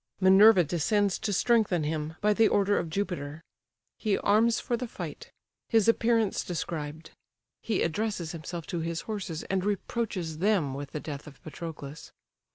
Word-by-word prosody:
Minerva 190 +1 +7
descends 180 +5 +1
to 210 - -2
strengthen 205 -5 +2
him, 155 +1 -3
by 210 0 +4
the 225 +1 +4
order 205 0 +2
of 170 - -4
Jupiter. 160 -4 -3 0.6
He 210 -3 +1
arms 225 +3 +3
for 240 - -1
the 245 +1 -4
fight: - - -7 0.4
his 225 -3 +3
appearance 230 -2 +2
described. 160 -2 -5 0.5
He 225 - 0
addresses 180 -1 -2
himself 170 0 -6
to 170 - 0
his 165 0 -3
horses, 190 -7 -5
and 190 -1 -1
reproaches 200 -5 -2
them 185 -8 +2
with 140 0 -6
the 150 - -2
death 145 -1 -7
of 145 -2 -13
Patroclus. 155 -2 -8
180 Hz, 155 wpm, -28 LUFS, 160-210 Hz, 0.6 s, Minerva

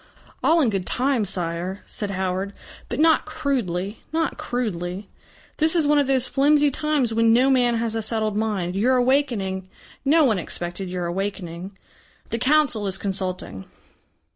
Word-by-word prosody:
"All 330 +1 +4
in 245 -7 +2
good 195 -3 -2
time, 255 -3 +1
Sire," 180 +1 -2
said 205 - -5
Howard. 190 +1 -2 0.4
"But - - -3
not 320 0 +4
crudely, 230 - -2
not 325 +1 0
crudely. 205 - -4 0.5
This 315 +2 +2
is 325 -3 +3
one 295 0 +4
of 285 - +1
those 260 -2 +2
flimsy 290 +2 +3
times 285 -5 0
when 225 0 +4
no 255 +3 +4
man 245 -2 +3
has 230 -1 -1
a 225 - -1
settled 215 -1 -1
mind. 205 -5 -1
Your 245 +6 +3
awakening 240 -8 0 0.3
no 310 +3 +4
one 220 -7 +2
expected 175 +2 -4
your 180 -1 -3
awakening. 185 0 -4 0.5
The 230 - -1
Council 260 -6 +2
is 190 0 -1
consulting." 185 - -3
220 Hz, 155 wpm, -23 LUFS, 190-270 Hz, 0.5 s, All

